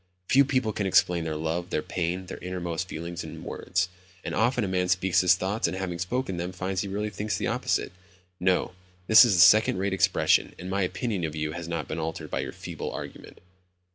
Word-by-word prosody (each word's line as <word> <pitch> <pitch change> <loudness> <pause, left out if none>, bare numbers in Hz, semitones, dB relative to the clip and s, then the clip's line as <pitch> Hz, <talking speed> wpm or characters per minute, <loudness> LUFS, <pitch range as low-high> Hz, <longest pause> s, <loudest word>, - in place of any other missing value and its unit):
Few 140 +2 +6
people 130 -5 0
can 100 -1 -1
explain 90 -2 +3
their 80 -1 -2
love, 80 +3 -2
their 75 - -1
pain, 90 +1 -2
their - - -8
innermost 90 -1 -4
feelings 85 +2 -5
in - - -9
words. 90 0 -1 0.4
And - - -4
often 120 +2 +1
a - - -1
man 90 -1 0
speaks 90 0 +3
his 90 0 +5
thoughts, 95 +4 -1
and 95 - -3
having 90 -2 -4
spoken 95 +1 -2
them, 90 +2 -4
finds 95 +1 -2
he 100 - -4
really 105 +2 -3
thinks 105 +2 -2
the - - -2
opposite. - - -1 0.5
No, 90 0 +1 0.3
this 110 +2 +9
is 95 -8 +6
second 105 +2 +6
rate 95 +1 -1
expression 95 -1 +2
and 90 +1 -7
my 100 +1 0
opinion 95 +1 -2
of 80 -1 -3
you 75 0 -2
has 85 +1 -6
not 85 -2 -3
been 80 - -4
altered 80 0 -5
by - - -1
your - - -3
feeble - - -6
argument." - - -9
90 Hz, 210 wpm, -27 LUFS, 85-100 Hz, 0.5 s, this